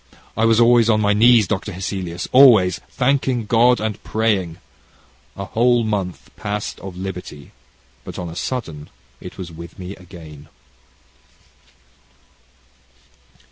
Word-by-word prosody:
I 110 - +1
was 115 0 +4
always 120 -1 +5
on 110 -1 +3
my 105 -1 +2
knees, 115 +1 +5
Dr. 105 +2 -3
Hesselius, 90 -1 -5
always, 110 -10 +6
thanking 130 -3 0
God 120 +2 +3
and 110 -1 -4
praying. 100 -7 -1 0.8
A 100 - -5
whole 120 +3 +2
month 95 - -4
passed 105 0 -5
of 95 -2 -9
liberty, 90 -6 -8 0.5
but - - -9
on 90 - -5
a 80 - -8
sudden, 85 - -5 0.3
it - - -11
was 90 -2 -7
with 85 +1 -11
me 95 +2 -8
again." 80 -5 -13
100 Hz, 125 wpm, -20 LUFS, 90-115 Hz, 0.8 s, always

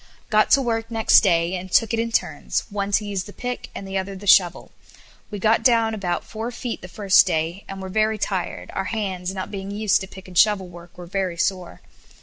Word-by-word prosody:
Got 215 0 +4
to 275 - +5
work 225 -2 -2
next 225 -1 +5
day, 170 -3 +2
and 185 0 -5
took 225 +3 +3
it 225 - 0
in 230 0 -1
turns, 155 -9 -1
one 200 0 -3
to 210 - +2
use 200 -2 -3
the 205 - -10
pick, 245 +3 -5
and 195 - -7
the 195 0 -1
other 195 +1 -5
the 195 +2 -10
shovel. 180 -3 +4 0.6
We 205 - -5
got 220 +3 +2
down 230 -3 +3
about 180 -5 -2
four 225 +1 -5
feet 245 -1 -5
the 180 - -9
first 195 0 +4
day, 165 +2 -2
and 195 0 -6
were - - -5
very 215 +3 +1
tired. 190 -3 -3
Our 195 - -2
hands, 190 -5 -3
not 185 - -5
being 195 -1 -6
used 205 0 +1
to 190 - -6
pick 190 0 -13
and 185 - -12
shovel 205 0 +4
work, 175 0 -14
were 175 - -8
very 185 -1 -3
sore. 185 -1 -2
195 Hz, 225 wpm, -22 LUFS, 185-220 Hz, 0.6 s, to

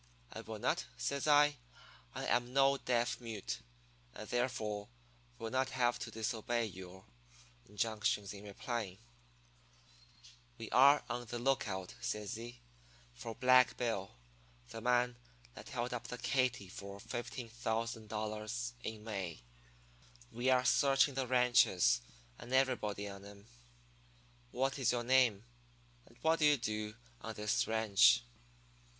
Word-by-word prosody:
"'I - - -6
will - - -7
not,' - - -1
says 140 +1 -2
I. 145 0 +5 0.6
'I - - -3
am 120 +1 +1
no 135 0 +4
deaf 120 0 0
mute, 115 -4 -5 0.6
and 110 - -8
therefore 120 -5 -2 0.5
will 115 - -5
not 130 0 +1
have 120 -2 +1
to - - -5
disobey 115 +1 -1
your 95 -2 -10 0.6
injunctions 105 -1 -1
in 100 0 -10
replying.' 105 -1 -4 1.6
"'We - - -7
are 140 +3 +6
on 120 -1 -4
the 120 - -4
lookout,' 110 -7 -1
says 105 -4 -3
he, 120 +2 -8 0.5
'for 110 - -7
Black 130 -1 +5
Bill, 110 -5 -2 0.5
the 115 - -7
man 125 0 +2 0.4
that - - -11
held 125 -1 -3
up 120 - -5
the 125 - -5
Katy 125 -4 0
for 100 +2 -8
$15,000 110 - -4
in 110 -1 -5
May. 95 - -5 0.9
We 120 +2 0
are 130 -1 +4
searching 135 +2 +4
the 130 -1 -2
ranches 120 - +4 0.4
and 120 - -10
everybody 110 -6 +1
on 100 -1 -9
'em. 100 0 -13 1.0
What 135 +3 -1
is 130 - +3
your 120 -1 -1
name, 120 -4 +3 0.6
and 115 - -20
what 160 +1 +3
do 155 - +4
you 150 -1 +5
do 105 -2 -3 0.3
on 110 -1 -6
this 105 0 0
ranch?' 110 - +5
115 Hz, 130 wpm, -35 LUFS, 105-125 Hz, 1.6 s, are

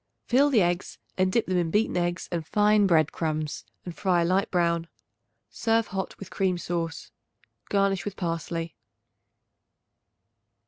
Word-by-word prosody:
Fill 275 +4 +4
the 230 -9 +4
eggs 175 +1 -2 0.2
and 185 0 +2
dip 230 +3 +2
them 185 -1 +1
in 170 -2 0
beaten 210 +6 +1
eggs 175 0 -1
and 165 -3 -3
fine 210 0 +4
bread 160 -4 +3
crumbs 155 -2 -3 0.2
and 175 -2 -6
fry 180 -3 +2
a - - +1
light 190 +4 +1
brown. 170 -2 +1 0.6
Serve 225 -1 +1
hot 190 0 -4
with 195 - -10
cream 185 -2 0
sauce. 170 -1 -4 0.6
Garnish 195 -1 +1
with 205 -1 -5
parsley. 165 -2 -3
180 Hz, 145 wpm, -26 LUFS, 170-200 Hz, 0.6 s, Fill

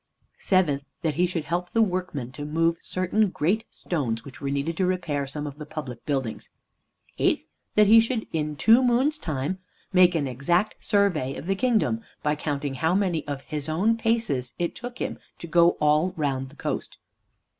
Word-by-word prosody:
Seventh, 175 -8 +2 0.2
that 160 -2 +1
he 175 +5 +2
should 170 -3 -3
help 175 +3 -2
the 230 - +2
workmen 180 - -3
to 145 - -7
move 165 +3 +1
certain 185 +3 +1
great 185 +7 0
stones 120 -10 -3
which 140 - -11
were 140 - -2
needed 140 +4 -1
to 190 - +2
repair 155 -7 -1
some 145 +2 -4
of 145 0 -7
the 150 - -6
public 140 -7 -7
buildings. 135 -6 -2 0.7
Eighth, - - +2 0.3
that 210 - +6
he 220 +3 +8
should 225 0 0
in 150 -1 -1
"two 225 - +5
moons' 260 +5 +2
time" 155 +4 -2 0.3
make 180 -1 +6
an 145 -4 0
exact 170 - 0
survey 180 - +2
of - - -7
the 195 - +1
kingdom, 225 +1 +1 0.2
by 150 - +2
counting 145 -2 -3
how 160 +7 +1
many 180 -7 0
of 140 -1 -4
his 150 0 -5
own 195 +9 +2
paces 225 - -1
it 170 -1 -1
took 245 0 -7
him - - -4 0.2
to - - -8
go 170 +1 +4
all 155 +4 +3
round 135 -3 -1
the 145 - -17
coast. - - -4
165 Hz, 185 wpm, -26 LUFS, 145-195 Hz, 0.7 s, he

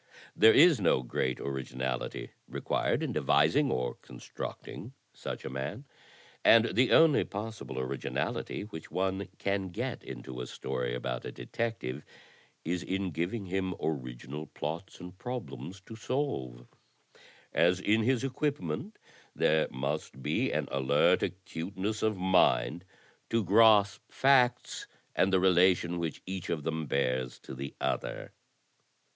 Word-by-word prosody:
There 110 +1 +8
is 155 - +6
no 75 -7 +3
great 65 +1 -1
originality 65 -2 -3 0.2
required - - 0
in - - -1
devising 80 - +3
or 65 - -1
constructing - - -8 0.2
such - - -6
a - - -3
man, 70 - -4 0.6
and 115 0 +6
the 125 +1 +4
only 160 -2 +6
possible 105 -8 -6
originality 65 +8 -3
which 100 -7 -9
one 95 +1 -1
can 100 -1 -1
get 85 - -4
into 65 -1 -7
a 60 - -5
story - - -3
about 60 0 -3
a - - -5
detective 75 - -4 0.6
is 85 +2 -1
in 95 0 -2
giving 90 +7 -2
him 95 0 -2
original 70 +1 -4
plots 80 +7 -5
and 90 +1 -9
problems 120 -6 -6
to 110 +3 -11
solve, 110 - -3 0.9
as 90 +2 +4
in 105 +3 +3
his 130 +2 +2
equipment 150 - -2 0.4
there 80 0 +3
must 70 0 -4
be - - +1
an - - -1
alert 70 +6 +3
acuteness 95 +3 -3
of 110 -2 +1
mind 90 -2 +3 0.4
to 115 -1 +2
grasp 105 +1 +5
facts 130 -2 +3 0.3
and 95 - +3
the 95 - +4
relation 90 -1 +4
which 85 -2 -4
each 95 -1 -5
of 80 -3 -1
them 80 -1 -2
bears 65 -2 0
to - - -9
the 70 +2 -6
other." - - -3
90 Hz, 130 wpm, -30 LUFS, 70-110 Hz, 0.9 s, There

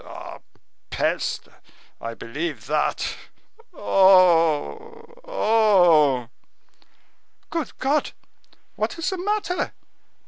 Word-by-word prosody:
"Ah, - - -10 0.5
peste! - - -2 0.5
I 115 0 -6
believe 145 +8 -5
that. 150 +2 -1 0.6
Oh! 190 - +3 0.2
oh!" 180 - +3 1.2
"Good 330 -4 -4
God! 285 +3 0 0.6
what - - -3
is 330 - -2
the 380 - -4
matter?" 405 -1 -2
195 Hz, 75 wpm, -23 LUFS, -, 1.2 s, Oh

